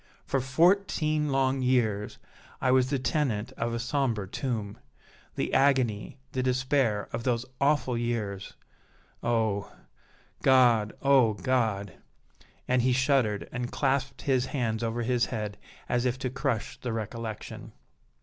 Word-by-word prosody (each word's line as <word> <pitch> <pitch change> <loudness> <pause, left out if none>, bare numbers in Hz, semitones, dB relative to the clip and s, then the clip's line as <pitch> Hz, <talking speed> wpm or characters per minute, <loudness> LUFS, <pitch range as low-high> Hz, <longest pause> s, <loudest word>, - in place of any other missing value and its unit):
For 135 - 0
fourteen 155 +1 +2
long 135 0 +1
years 115 -5 +1 0.4
I 130 - +2
was 130 0 +4
the 140 - +1
tenant 130 -5 -1
of 115 -2 -3
a 115 - -2
sombre 120 -5 -1
tomb. 110 -3 -4 0.6
The - - -2
agony, 130 -6 +2
the 130 - -1
despair 130 -4 +1
of 115 - -2
those 120 -1 0 0.2
awful 140 -3 +2
years 115 -5 -3 0.7
oh! 110 -4 0 0.7
God! 120 -5 +4
oh! 135 -5 +5
God!" 105 -3 0 0.7
and 125 0 +3
he 125 +1 +2
shuddered 130 -6 +1
and 125 0 -4
clasped 135 -1 -1
his 130 -2 +1
hands 115 -5 -1
over 115 +1 -1
his 120 0 +1
head 105 -3 -4 0.3
as 120 0 +1
if 125 0 -1
to 130 -1 -3
crush 120 -4 -2
the 125 - -4
recollection. 110 0 -6
125 Hz, 130 wpm, -28 LUFS, 110-135 Hz, 0.7 s, oh